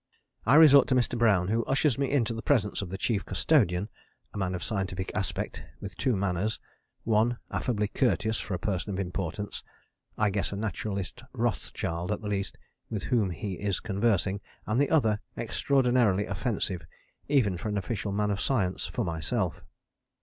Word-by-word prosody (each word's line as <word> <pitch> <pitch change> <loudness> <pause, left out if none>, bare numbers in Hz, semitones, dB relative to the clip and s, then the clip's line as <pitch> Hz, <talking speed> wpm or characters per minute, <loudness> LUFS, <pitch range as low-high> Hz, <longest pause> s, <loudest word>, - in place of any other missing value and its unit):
I 125 - +6
resort 150 -3 +8
to 130 - +2
Mr. 125 -1 +2
Brown, 100 -6 +3
who 115 +2 +1
ushers 140 -1 +2
me 140 -2 +1
into 120 -5 +1
the 115 - -5
presence 110 -9 +1
of 100 - -5
the 95 - -4
Chief 105 -2 0
Custodian, 95 - +2 0.5
a - - -6
man 90 -1 -1
of 85 - -5
scientific 95 -3 -2
aspect, 100 -3 -2 0.2
with 100 -2 -7
two 125 +6 +1
manners: 95 +2 -1 0.4
one, 115 +2 +2
affably 105 -4 0
courteous, 110 -1 +1
for 95 - -3
a - - -1
Person 95 +2 -2
of - - -3
Importance 95 +2 -4 0.5
(I 105 -1 +2
guess 100 0 -1
a - - -3
Naturalist 100 -2 -3
Rothschild 100 -6 -2
at 105 - -2
least) 100 -3 -2 0.3
with 105 -3 -3
whom 115 -7 +2
he 90 +2 -4
is 100 -3 0
conversing, 100 -2 0 0.2
and 110 +4 0
the 145 - +2
other, 110 -9 +3 0.2
extraordinarily 120 -7 +2
offensive 100 -3 -2 0.5
even 125 -10 +3
for 105 +5 -4
an 105 - -1
official 100 0 -2
man 105 +1 +1
of 100 - -2
science, 95 -9 0
for 120 - -2
myself. 80 -3 -2
105 Hz, 170 wpm, -28 LUFS, 95-115 Hz, 0.5 s, resort